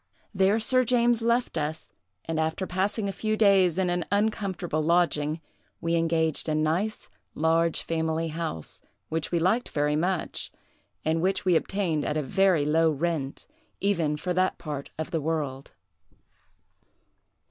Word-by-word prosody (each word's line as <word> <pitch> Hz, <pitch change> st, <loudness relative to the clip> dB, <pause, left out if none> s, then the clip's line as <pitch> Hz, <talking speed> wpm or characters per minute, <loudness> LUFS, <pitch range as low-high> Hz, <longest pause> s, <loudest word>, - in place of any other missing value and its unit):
There 195 Hz, +3 st, +3 dB
Sir 255 Hz, +3 st, +3 dB
James 240 Hz, -1 st, +2 dB
left 235 Hz, -5 st, +1 dB
us, 155 Hz, +1 st, -4 dB, 0.3 s
and, 160 Hz, -1 st, -2 dB
after 160 Hz, +4 st, -1 dB
passing 195 Hz, +3 st, -1 dB
a -, -, -1 dB
few 215 Hz, +2 st, -2 dB
days 195 Hz, -5 st, +4 dB
in 185 Hz, -2 st, +1 dB
an 175 Hz, 0 st, 0 dB
uncomfortable 200 Hz, -6 st, 0 dB
lodging, 160 Hz, -2 st, +1 dB, 0.4 s
we 165 Hz, 0 st, -1 dB
engaged 165 Hz, -1 st, +1 dB
a 155 Hz, -, +1 dB
nice, 165 Hz, +8 st, -1 dB, 0.3 s
large 165 Hz, +1 st, +2 dB
family 160 Hz, 0 st, -1 dB
house, 160 Hz, -, -5 dB, 0.3 s
which 160 Hz, 0 st, -2 dB
we 175 Hz, -, +2 dB
liked 185 Hz, +9 st, +1 dB
very 150 Hz, 0 st, 0 dB
much, 175 Hz, +2 st, -2 dB, 0.5 s
and 160 Hz, +1 st, +1 dB
which 190 Hz, +2 st, 0 dB
we 180 Hz, -2 st, +4 dB
obtained 165 Hz, -4 st, 0 dB
at 150 Hz, -, -1 dB
a 155 Hz, -, 0 dB
very 185 Hz, 0 st, +3 dB
low 160 Hz, +2 st, +3 dB
rent, 155 Hz, -2 st, -2 dB, 0.3 s
even 170 Hz, -7 st, +1 dB
for 180 Hz, +4 st, -2 dB
that 185 Hz, +1 st, +1 dB
part 145 Hz, -3 st, -6 dB
of 160 Hz, +2 st, -4 dB
the 165 Hz, -3 st, -1 dB
world. 145 Hz, -4 st, -3 dB
165 Hz, 145 wpm, -27 LUFS, 155-195 Hz, 0.5 s, days